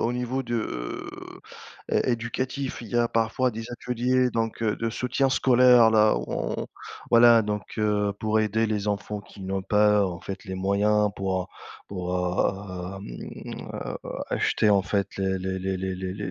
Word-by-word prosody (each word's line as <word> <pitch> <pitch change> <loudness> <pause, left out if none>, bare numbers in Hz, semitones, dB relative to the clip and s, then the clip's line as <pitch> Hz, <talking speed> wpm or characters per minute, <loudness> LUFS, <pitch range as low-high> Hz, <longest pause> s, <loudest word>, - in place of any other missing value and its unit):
au 115 - +1
niveau 125 +2 -2
de 120 -1 -4
heu, 60 - -5 0.5
é - - +2
éducatif, 130 +3 -3
il 115 - -9
y 120 - -2
a 120 0 +4
parfois 115 +3 +1
des 115 0 -6
ateliers 125 +1 +1
donc 115 0 -2
heu, 105 -2 +1
de 115 - -1
soutien 125 +4 0
scolaire 125 -3 +6
là 110 -1 +5
on - - -2 0.5
voilà 115 -1 +7
donc 105 -1 -3
heu, 105 -1 +1
pour 110 0 +1
aider 110 +1 +1
les 105 -1 -1
enfants 105 0 -2
qui 100 0 -13
n'ont 95 +1 -2
pas 105 +1 +3
en 85 -2 -5
fait 95 +1 -6
les 95 - -4
moyens 105 +2 +2
pour, 95 -1 -1
heu, - - -8 0.4
pour, 90 -2 -4 0.8
hem, 80 -11 -8
heu, - - -5 0.3
acheter 105 - +2
en 100 -1 +5
fait 100 +1 -1
les 95 0 0 0.2
les 95 0 -2
les 95 0 -3
les 95 0 -4
les 100 -2 -4
105 Hz, 170 wpm, -26 LUFS, 100-120 Hz, 0.8 s, voilà